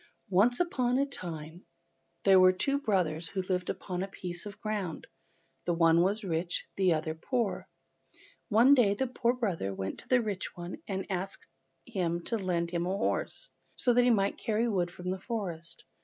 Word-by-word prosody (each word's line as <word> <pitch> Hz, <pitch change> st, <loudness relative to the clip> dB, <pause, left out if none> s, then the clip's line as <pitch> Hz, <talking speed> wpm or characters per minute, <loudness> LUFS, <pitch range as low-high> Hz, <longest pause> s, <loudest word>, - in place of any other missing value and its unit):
ONCE 220 Hz, +7 st, +4 dB
upon 255 Hz, -8 st, +1 dB
a 275 Hz, -, +3 dB
time 170 Hz, -, -7 dB, 0.6 s
there 190 Hz, -1 st, +7 dB
were 185 Hz, 0 st, +8 dB
two 275 Hz, +10 st, 0 dB
brothers 175 Hz, -, 0 dB
who 190 Hz, -, -2 dB
lived 180 Hz, -1 st, -1 dB
upon 180 Hz, -2 st, -3 dB
a 195 Hz, -, -2 dB
piece 180 Hz, 0 st, -4 dB
of 200 Hz, -, -10 dB
ground. 205 Hz, -7 st, -3 dB, 0.6 s
The 175 Hz, -, +1 dB
one 165 Hz, 0 st, +5 dB
was 200 Hz, +5 st, +1 dB
rich 170 Hz, -1 st, -2 dB
and -, -, -45 dB
the 180 Hz, -2 st, +5 dB
other 155 Hz, 0 st, -2 dB
poor. 225 Hz, +6 st, -2 dB, 0.8 s
One 235 Hz, +5 st, +6 dB
day 220 Hz, -7 st, +4 dB
the 265 Hz, -, 0 dB
poor 240 Hz, -1 st, +1 dB
brother 175 Hz, -, -2 dB
went 95 Hz, 0 st, -4 dB
to -, -, -12 dB
the 255 Hz, -, +4 dB
rich 205 Hz, -6 st, -4 dB
one 175 Hz, +1 st, -7 dB
to 195 Hz, 0 st, -3 dB
ask 190 Hz, +2 st, -4 dB, 0.4 s
him 170 Hz, -2 st, -1 dB
to 230 Hz, -, -1 dB
lend 170 Hz, -3 st, -1 dB
him 175 Hz, 0 st, -1 dB
a 190 Hz, +2 st, 0 dB
horse, -, -, -2 dB, 0.2 s
so 245 Hz, -, +2 dB
that 245 Hz, -, +5 dB
he 245 Hz, -, +4 dB
might 200 Hz, -4 st, +2 dB
carry 225 Hz, +1 st, +1 dB
wood 185 Hz, -6 st, +1 dB
from 180 Hz, +1 st, -5 dB
the 190 Hz, -, -3 dB
forest. 185 Hz, -8 st, -4 dB
190 Hz, 185 wpm, -30 LUFS, 175-230 Hz, 0.8 s, were